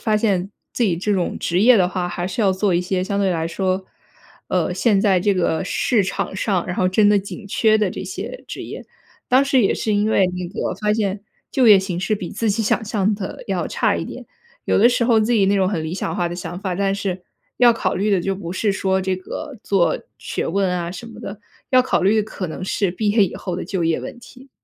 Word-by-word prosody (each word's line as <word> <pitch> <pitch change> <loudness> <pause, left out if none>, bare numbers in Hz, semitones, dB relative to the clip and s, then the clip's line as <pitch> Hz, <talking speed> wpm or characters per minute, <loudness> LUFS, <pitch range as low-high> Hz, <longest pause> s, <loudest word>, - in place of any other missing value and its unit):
发 215 -2 +1
现 200 -3 0 0.2
自 - - -1
己 185 -7 +2
这 205 +4 -1
种 185 -3 -1
职 175 +2 0
业 240 +3 +7
的 180 -3 +3
话， 180 -1 -2
还 175 0 -3
是 190 +5 -2
要 195 -2 +3
做 190 -1 +1
一 175 - +2
些 185 0 -1
相 200 +1 -2
对 195 -2 +2
来 165 -2 -1
说， 185 +2 -1 0.6
呃， - - 0
现 210 -5 +2
在 195 -3 +3
这 200 +2 +2
个 180 -2 0
市 220 +2 +1
场 190 0 -3
上， 190 -2 0
然 180 - -3
后 185 - +1
真 205 +3 +4
的 210 - +5
紧 200 +2 -7
缺 215 +2 +3
的 210 - +2
这 - - -6
些 - - -7
职 - - -6
业。 - - -8 0.4
当 260 +2 +5
时 275 -2 +3
也 195 - +3
是 215 - -1
因 205 +1 +1
为 195 -3 +4
那 180 -1 -4
个 190 - -3
发 210 0 0
现 205 -2 -1 0.3
就 255 -4 +4
业 200 -2 +9
形 190 -2 -3
势 215 +3 0
比 180 -3 -6
自 220 +1 -1
己 215 +3 0
想 220 +2 +1
象 210 0 0
的 205 - -7
要 - - -1
差 - - +1
一 - - -3
点。 - - -9 0.4
有 - - +1
的 230 - +7
时 245 -1 +1
候 230 -2 +4
自 220 +3 +1
己 205 -5 +3
那 200 - +3
种 190 -2 +2
很 165 -6 -2
理 160 - -4
想 195 - -3
化 175 -3 0
的 175 - -5
想 175 0 -6
法， 190 -2 -3
但 195 +1 0
是， 195 -2 -3 0.4
要 245 -1 +7
考 200 -5 -1
虑 205 +3 0
的 195 -3 +3
就 195 +2 -1
不 180 -2 -6
是 205 +2 0
说 190 0 0
这 190 0 -1
个 275 +9 -7
做 175 -5 +2 0.2
学 - - -3
问 195 +2 +1
啊 175 -1 -2
什 195 +6 -8
么 225 -1 -11
的， 200 -2 -7 0.3
要 255 -1 +6
考 250 - 0
虑 215 +3 +4
可 200 -3 -5
能 170 +3 -6
是 195 -1 0
毕 205 +3 -1
业 210 -1 +4
以 - - -5
后 180 - -4
的 180 - -4
就 185 -4 -2
业 165 0 +1
问 - - -8
题。 255 +2 -15
195 Hz, 275 characters per minute, -21 LUFS, 185-215 Hz, 0.6 s, 业